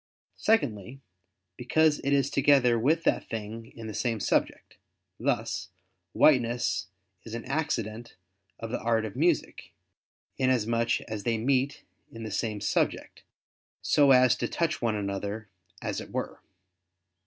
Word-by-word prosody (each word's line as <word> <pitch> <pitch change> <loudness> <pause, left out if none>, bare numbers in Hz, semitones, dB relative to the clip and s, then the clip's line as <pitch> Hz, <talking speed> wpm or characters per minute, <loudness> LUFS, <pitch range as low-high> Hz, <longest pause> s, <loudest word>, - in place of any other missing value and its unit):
Secondly, 130 - 0 0.6
because 150 +5 +2
it 140 - -2
is 140 -1 +2
together 135 -4 +4
with 155 +8 +2
that - - 0
thing 115 +1 -6
in 115 - -8
the 110 - -6
same 110 +1 -1
subject: - - -1 0.4
thus, 95 - -1 0.4
whiteness 120 - +3 0.4
is 115 0 -7
an 115 - -6
accident 120 -6 -3 0.4
of 115 -1 -6
the 120 - -2
art 115 -1 +1
of 105 - -7
music, 165 +4 0 0.7
inasmuch 115 -2 +1
as 110 -2 -6
they 115 +1 0
meet 130 +4 0 0.3
in 115 0 -8
the 110 - -5
same 105 +1 -2
subject, 105 - -1 0.6
so 145 -2 +4
as 130 -2 +6
to - - -1
touch 160 -2 -1
one 115 -2 +1
another, 100 +1 -4 0.3
as - - -2
it - - -10
were. - - -4
115 Hz, 135 wpm, -28 LUFS, 110-135 Hz, 0.7 s, as